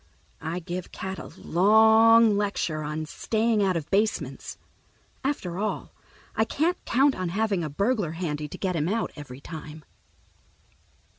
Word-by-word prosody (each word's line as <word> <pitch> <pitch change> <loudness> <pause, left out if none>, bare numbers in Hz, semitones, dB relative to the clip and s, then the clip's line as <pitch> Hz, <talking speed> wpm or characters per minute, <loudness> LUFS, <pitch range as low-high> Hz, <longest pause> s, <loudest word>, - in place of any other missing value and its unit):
I 160 +3 -3
give 180 0 -5
Cat 190 0 -5
a - - -8
long 220 +4 +5
lecture 200 -6 -1
on 155 +1 -3
staying 220 +6 0
out 190 -3 +2
of 155 - -5
basements. 210 +2 -1 0.7
After 195 -11 -2
all, 215 +1 -3 0.4
I 220 - +3
can't 320 +10 -1
count 270 +3 +3
on 185 -6 -3
having 200 -1 0
a 155 - -3
burglar 200 - 0
handy 155 -3 -3
to - - -9
get 185 -2 -1
him 160 +1 0
out 225 +2 -1
every 140 -3 -10
time. 155 -1 -9
190 Hz, 145 wpm, -26 LUFS, 160-220 Hz, 0.7 s, long